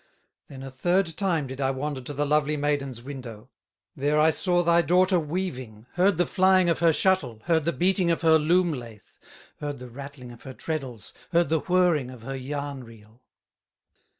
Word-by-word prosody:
"Then 135 Hz, -1 st, -10 dB
a 135 Hz, -, -8 dB
third 175 Hz, +5 st, 0 dB
time 170 Hz, -6 st, 0 dB
did 130 Hz, +1 st, -7 dB
I 135 Hz, -, +1 dB
wander 135 Hz, +1 st, -3 dB
To 125 Hz, -, -8 dB
the 145 Hz, +2 st, 0 dB
lovely 150 Hz, 0 st, +1 dB
maiden's 140 Hz, -4 st, -2 dB
window; 125 Hz, -4 st, -9 dB, 0.4 s
There 145 Hz, +2 st, +1 dB
I 160 Hz, +1 st, +5 dB
saw 175 Hz, +1 st, +1 dB
thy 170 Hz, 0 st, +4 dB
daughter 180 Hz, +1 st, +3 dB
weaving, 140 Hz, -, -5 dB
Heard 185 Hz, 0 st, +2 dB
the 175 Hz, -, +2 dB
flying 185 Hz, -1 st, +3 dB
of 165 Hz, -, -1 dB
her 165 Hz, 0 st, +4 dB
shuttle, 150 Hz, -, +1 dB
Heard 165 Hz, -3 st, +1 dB
the 170 Hz, -, +1 dB
beating 185 Hz, +1 st, +2 dB
of 165 Hz, -, 0 dB
her 160 Hz, -1 st, +5 dB
loom 170 Hz, +2 st, +2 dB
lathe, 115 Hz, -5 st, -9 dB, 0.6 s
Heard 145 Hz, -1 st, -4 dB
the 125 Hz, 0 st, -10 dB
rattling 135 Hz, -1 st, -10 dB
of 120 Hz, -, -14 dB
her 130 Hz, -1 st, -10 dB
treddles, 130 Hz, -9 st, -5 dB, 0.2 s
Heard 170 Hz, -2 st, +3 dB
the 160 Hz, 0 st, +2 dB
whirring 175 Hz, -7 st, +1 dB
of 125 Hz, -3 st, -12 dB
her 135 Hz, +3 st, -5 dB
yarn 140 Hz, 0 st, -5 dB
reel." 115 Hz, 0 st, -17 dB
145 Hz, 185 wpm, -25 LUFS, 130-170 Hz, 0.6 s, I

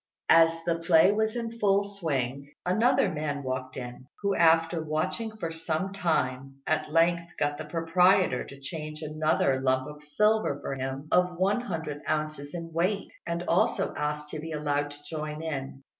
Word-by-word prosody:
As 165 Hz, 0 st, +8 dB, 0.2 s
the 170 Hz, -1 st, 0 dB
play 165 Hz, +2 st, +5 dB
was 220 Hz, +2 st, 0 dB
in 230 Hz, -1 st, -4 dB
full 200 Hz, -1 st, +3 dB
swing 140 Hz, -9 st, -3 dB
another 220 Hz, +8 st, +3 dB
man 150 Hz, -2 st, -3 dB
walked 130 Hz, 0 st, -4 dB
in, 125 Hz, 0 st, -7 dB, 0.2 s
who 200 Hz, 0 st, +2 dB
after 165 Hz, -1 st, +4 dB
watching 160 Hz, +9 st, -2 dB
for 165 Hz, -6 st, -3 dB
some 165 Hz, +3 st, -2 dB
time 135 Hz, -7 st, -1 dB
at 155 Hz, -1 st, 0 dB
length 170 Hz, +1 st, +2 dB
got 145 Hz, 0 st, -1 dB
the -, -, -5 dB
proprietor 180 Hz, -2 st, +3 dB
to 140 Hz, -, -12 dB
change 155 Hz, +2 st, -6 dB
another 155 Hz, -3 st, +1 dB
lump 130 Hz, 0 st, +1 dB
of 150 Hz, 0 st, -10 dB
silver 210 Hz, 0 st, +2 dB
for -, -, -4 dB
him 135 Hz, +2 st, -4 dB
of 180 Hz, -1 st, +3 dB
one 195 Hz, +6 st, +2 dB
hundred 160 Hz, -9 st, -4 dB
ounces 155 Hz, -1 st, -2 dB
in 165 Hz, -1 st, -6 dB
weight, 185 Hz, +5 st, 0 dB
and 170 Hz, +1 st, -2 dB
also 175 Hz, 0 st, +1 dB
asked 150 Hz, 0 st, -3 dB
to 155 Hz, -, -5 dB
be 160 Hz, +2 st, -6 dB
allowed 145 Hz, -1 st, -1 dB
to 145 Hz, 0 st, -12 dB
join. 150 Hz, -3 st, -5 dB
155 Hz, 165 wpm, -28 LUFS, 145-180 Hz, 0.2 s, As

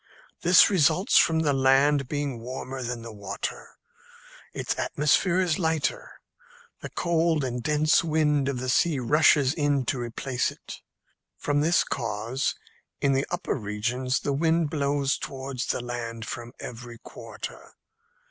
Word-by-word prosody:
This 180 Hz, +2 st, +7 dB
results 185 Hz, -, +2 dB
from 160 Hz, -1 st, +3 dB
the 145 Hz, -3 st, +2 dB
land 135 Hz, +1 st, +3 dB
being 145 Hz, -3 st, -3 dB
warmer 130 Hz, +2 st, -6 dB
than 120 Hz, -1 st, -4 dB
the 115 Hz, -1 st, -8 dB
water. 100 Hz, -1 st, -6 dB, 0.7 s
Its -, -, -3 dB
atmosphere 170 Hz, +5 st, +2 dB
is 180 Hz, -3 st, +1 dB
lighter. 160 Hz, -3 st, -1 dB, 0.7 s
The -, -, -7 dB
cold 165 Hz, -3 st, +1 dB
and 125 Hz, -1 st, -3 dB
dense 150 Hz, +5 st, +3 dB
wind 150 Hz, -3 st, +1 dB
of 135 Hz, -, -2 dB
the 130 Hz, +1 st, -4 dB
sea 150 Hz, +4 st, +2 dB
rushes 145 Hz, +1 st, +4 dB
in 145 Hz, -4 st, 0 dB
to 125 Hz, -, -1 dB
replace 120 Hz, +2 st, -2 dB
it. -, -, -11 dB, 0.6 s
From 145 Hz, 0 st, 0 dB
this 165 Hz, +3 st, +3 dB
cause, 115 Hz, +2 st, -2 dB, 0.4 s
in 140 Hz, -1 st, +2 dB
the 135 Hz, +1 st, 0 dB
upper 175 Hz, +1 st, -2 dB
regions 120 Hz, +4 st, -2 dB
the 140 Hz, -, -1 dB
wind 160 Hz, +1 st, +1 dB
blows 140 Hz, -2 st, 0 dB
towards 130 Hz, -2 st, -5 dB
the -, -, -1 dB
land 115 Hz, -2 st, -5 dB
from 120 Hz, +1 st, -7 dB
every 120 Hz, 0 st, -8 dB
quarter. -, -, -10 dB
140 Hz, 140 wpm, -26 LUFS, 120-155 Hz, 0.7 s, This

